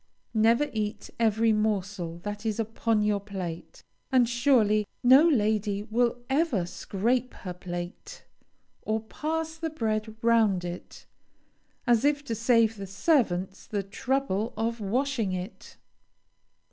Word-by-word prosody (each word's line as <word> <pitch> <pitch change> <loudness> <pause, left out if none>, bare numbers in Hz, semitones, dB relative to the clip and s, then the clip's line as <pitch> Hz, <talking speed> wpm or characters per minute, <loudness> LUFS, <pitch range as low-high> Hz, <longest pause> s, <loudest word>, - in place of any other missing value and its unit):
Never 230 +6 +3
eat 210 -1 -3
every 225 0 +3
morsel 200 -5 -1
that 205 0 -5
is 220 -1 -2
upon 225 -1 0
your 210 -1 +1
plate; 190 -5 -7 0.3
and 255 -3 +4
surely 230 -4 +3 0.2
no 265 +7 +7
lady 210 -5 +1
will 235 +3 +1
ever 265 - +1
scrape 235 +8 -1
her 180 -4 -6
plate, 175 0 -7 0.6
or 220 +1 -1
pass 320 +7 -3
the 325 0 -3
bread 220 -6 -2
round 220 -6 +3
it, 175 0 -8 0.8
as 240 -1 +3
if 290 0 +2
to 235 - -3
save 230 -1 +3
the 200 -1 -6
servants 195 - 0
the 205 -2 -2
trouble 230 +1 -1
of 230 +1 -1
washing 230 -1 0
it. 185 +4 -7
220 Hz, 125 wpm, -27 LUFS, 200-245 Hz, 0.8 s, no